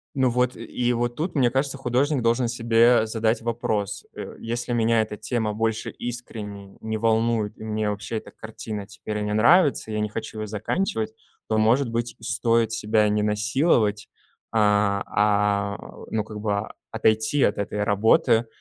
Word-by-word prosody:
Ну 130 -2 +3
вот 125 +1 0
и 115 - -8
и 120 +2 0
вот 120 0 -1
тут, 165 +2 -3
мне 125 -4 +4
кажется, 135 +2 -1
художник 135 +2 +1
должен 120 +2 +2
себе 115 0 +4
задать 110 +1 0
вопрос. 110 -3 -2
Э. - - -7
Если 120 +1 -3
меня 115 -1 +3
эта 110 -1 -4
тема 110 0 -2
больше 110 0 -1
искренне 105 -5 -7
не 110 0 -3
волнует, 115 -1 +1
и - - -10
мне 110 -1 -1
вообще 105 +2 -4
эта - - -8
картина 110 -2 -7
теперь 105 0 -5
не 105 0 -2
нравится, 140 - +4
я 105 - -1
не 105 - -1
хочу 110 +1 -6
его 110 - -3
заканчивать, 110 - -2 0.3
то, 110 - +1
может 115 +4 +3
быть, 115 0 -2
и - - -18
стоит 115 -1 +1
себя 110 -1 +2
не 105 0 +1
насиловать, 105 0 +1 0.4
а, 105 -2 +3
а, 105 -1 +1
э, - - -11
ну 110 -1 0
как 105 -1 -8
бы, 105 -2 0
а, 100 - -5 0.2
отойти 110 +6 +2
от 100 - +2
этой 105 +1 -2
работы 110 +2 +3
110 Hz, 175 wpm, -24 LUFS, 105-120 Hz, 0.4 s, мне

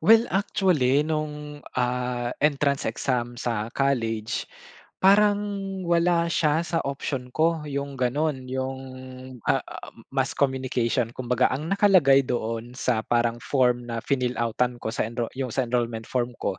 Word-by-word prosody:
Well 225 +1 +7
actually, 170 -9 +2
nung 150 -1 -4 0.2
ah 125 -1 -1
entrance 140 -1 +2
exam 120 -2 -1
sa 115 -2 -2
college, 115 -5 0 0.6
parang 205 +2 +6 0.5
wala 170 0 +3
siya 155 -1 +2
sa 165 -1 -1
option 135 -2 -3
ko, 160 +1 +1
yung 140 0 -3
ganun. 130 +1 0
Yung 130 0 -3 0.7
ah, - - +3 0.5
mass 135 -1 0
communication, 130 -3 0
kumbaga 125 0 +2
ang 150 +5 -3
nakalagay 180 -10 +5
doon 115 0 -3
sa 125 -4 +1
parang 120 0 +1
form 125 -3 +1
na 115 0 -3
finill-out-tan 125 -2 0
ko, - - -2
sa - - 0
enro 120 0 -3
yung 130 -4 -3
sa 130 - +1
enrollment 115 -2 -1
form 125 -1 -1
ko, 95 -2 -1
130 Hz, 135 wpm, -25 LUFS, 120-150 Hz, 0.7 s, Well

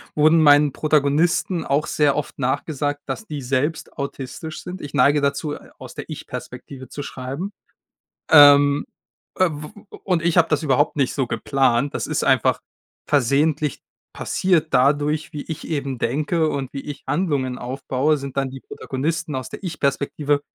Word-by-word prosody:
wurden 155 +2 +5
meinen 145 -1 +6
Protagonisten 155 +4 +1
auch 140 +2 0
sehr 145 -2 +2
oft 150 - -4
nachgesagt, 145 +2 -1
dass 220 - -5
die 150 -2 -5
selbst 140 +5 -1
autistisch 140 +2 -6
sind. 180 +1 -7
Ich 145 - -7
neige 145 +1 +4
dazu, 140 +1 -1
äh, - - -11
aus - - -10
der - - -7
Ich-Perspektive 130 -2 -8
zu 145 - -6
schreiben. 135 +10 -5 0.8
Ähm, 145 -1 +7 0.5
äh, 185 -2 +4
w 150 0 -7 0.3
o - - -10
und 180 -4 +1
ich 170 0 +1
habe 165 - +5
das 155 0 0
überhaupt 145 0 +2
nicht 140 -4 0
so 135 -3 -1
geplant. 130 +3 +1
Das - - -3
ist - - -1
einfach - - +2 0.4
versehentlich 145 +2 +1 0.3
passiert 175 -4 0
dadurch, 145 +3 +2
wie 150 - -5
ich 160 -1 -7
eben 140 -4 -3
denke 155 +5 0
und 135 -2 -3
wie 140 - -4
ich 145 -1 -8
Handlungen 145 -7 -1
aufbaue 135 +3 -1
sind 140 0 -7
dann 135 -1 0
die 135 0 -9
Protagonisten 150 +2 -3
aus 130 -1 -4
der - - -9
Ich-Perspektive 145 -3 -1
145 Hz, 160 wpm, -22 LUFS, 140-155 Hz, 0.8 s, Ähm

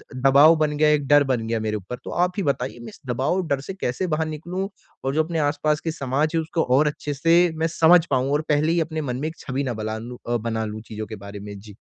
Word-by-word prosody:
दबाव 140 +5 +6
बन 155 -1 0
गया, 155 0 +4
एक 145 -2 +1
डर 145 0 +6
बन 125 -4 -1
गया 115 0 0
मेरे 110 -1 -2
ऊपर, 105 +5 -7
तो - - -7
आप 180 +1 +1
ही 200 - 0
बताइए? 135 -4 -2
मैं 120 - -9
इस - - -15
दबाव 130 +6 0
और 185 -1 -1
डर 140 -3 0
से 190 - -6
कैसे 185 -1 -2
बाहर 160 -1 0
निकलूँ? 175 +5 -4 0.4
और 135 - -1
जो 160 - +3
अपने 165 0 -3
आस-पास 150 +1 +1
के 165 - -1
समाज 145 0 -1
है 165 - +2
उसको 160 +1 -1
और 150 +2 +4
अच्छे 150 0 -3
से 165 +4 +4 0.2
मैं 160 +1 +1
समझ 165 +1 +5
पाऊँ 130 0 +1
और 150 - +2
पहले 150 +2 +2
ही 170 - +2
अपने 160 0 -3
मन 125 -4 -3
में 150 - -2
एक 160 - -7
छवि 135 +1 -3
ना 125 -3 -2
बला 110 0 -4
लूँ 120 +2 -8
अ, 120 0 +1
बना 110 0 -2
लूँ 110 0 -6
चीज़ों 110 -1 -7
के 110 - -7
बारे 100 0 -9
में? 100 0 -8
जी। 105 0 -13
145 Hz, 275 wpm, -23 LUFS, 120-160 Hz, 0.4 s, दबाव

